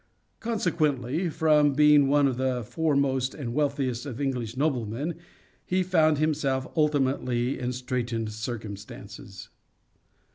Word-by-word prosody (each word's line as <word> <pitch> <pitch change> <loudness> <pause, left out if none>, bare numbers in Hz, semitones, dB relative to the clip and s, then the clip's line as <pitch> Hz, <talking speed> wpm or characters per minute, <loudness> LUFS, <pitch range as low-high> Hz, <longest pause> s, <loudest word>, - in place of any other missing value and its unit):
Consequently, 165 - 0
from 150 -2 +3
being 150 0 +5
one 145 0 +4
of 130 -2 -2
the 130 -2 -1
foremost 140 -2 0
and 125 -6 -5
wealthiest 140 -3 -1
of 130 -2 -6
English 125 -4 -2
noblemen 135 +1 -1 0.5
he 185 +1 0
found 160 -4 +3
himself 140 -3 0
ultimately 135 -4 +1
in 125 0 -2
straitened 120 -3 -3
circumstances. 105 -2 -8
135 Hz, 110 wpm, -27 LUFS, 120-150 Hz, 0.5 s, being